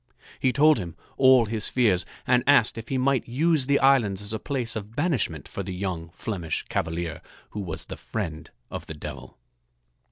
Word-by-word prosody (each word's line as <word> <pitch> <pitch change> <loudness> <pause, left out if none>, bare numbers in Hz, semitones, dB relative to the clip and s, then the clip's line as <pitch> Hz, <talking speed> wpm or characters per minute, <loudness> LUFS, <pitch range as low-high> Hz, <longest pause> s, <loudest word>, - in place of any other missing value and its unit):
He 130 - +2
told 150 +1 +5
him 85 -4 -6 0.2
all 130 -3 +6
his 110 0 -2
fears 105 -8 +2 0.2
and 125 -1 +3
asked 140 -6 +5
if 115 0 -8
he 135 - 0
might 130 0 +1
use 145 +2 +2
the 140 0 +4
islands 125 -9 +4
as 100 +2 -6
a 110 - -2
place 125 -4 -3
of 110 +1 -6
banishment 140 - -1
for - - -5
the 95 -1 -5
young 90 -3 -3
Flemish 90 -8 -3
cavalier 80 0 -2 0.3
who 105 - -5
was 85 -5 -4
the - - -7
friend 80 -1 -5 0.2
of - - -6
the 80 - -6
Devil. 70 -4 -8
110 Hz, 185 wpm, -26 LUFS, 90-130 Hz, 0.3 s, all